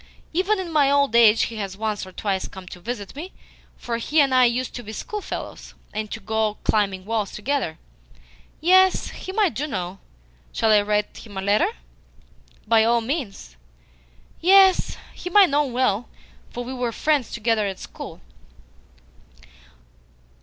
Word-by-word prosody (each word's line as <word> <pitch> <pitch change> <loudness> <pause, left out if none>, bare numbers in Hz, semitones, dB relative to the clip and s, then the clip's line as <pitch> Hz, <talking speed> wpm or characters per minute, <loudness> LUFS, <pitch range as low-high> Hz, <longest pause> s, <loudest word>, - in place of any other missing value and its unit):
Even 380 +5 +1
in 365 -3 -5
my 285 -3 +4
old 280 -4 +2
age 225 -2 +6
he 230 - -4
has 195 -2 -5
once 210 -2 -3
or - - -11
twice 195 0 -2
come 190 -2 -11
to 180 - -10
visit 210 +1 -6
me, 340 +6 -7 0.5
for 235 -1 -3
he 295 +7 0
and 275 -2 +4
I 255 -1 +6
used 245 +1 0
to 245 - -6
be 215 -2 -9
schoolfellows, 420 - -6 0.2
and 215 0 -3
to 220 - -5
go 220 -1 -1
climbing 195 -3 0
walls 215 -2 -2
together. 210 - -2 0.8
Yes, 375 +3 +4
him 375 +2 -8
I 415 -4 +4
do 285 +4 -4
know. 185 -7 -4 0.5
Shall 220 - +2
I 210 -1 +6
write 210 0 -1
him 205 -4 -11
a - - -2
letter?" 210 - +3 1.0
"By 220 0 +4
all 235 +1 +3
means." 225 - -5 0.8
"Yes, 380 +1 +5 0.2
him 360 +3 -2
I 405 - +9
know 295 -2 +1
well, 245 -4 0 0.4
for 245 - -6
we 255 +2 -6
were 245 -2 -2
friends 290 +1 0
together 225 -2 0
at 190 -1 -5
school." - - -9
235 Hz, 160 wpm, -23 LUFS, 210-290 Hz, 1.0 s, I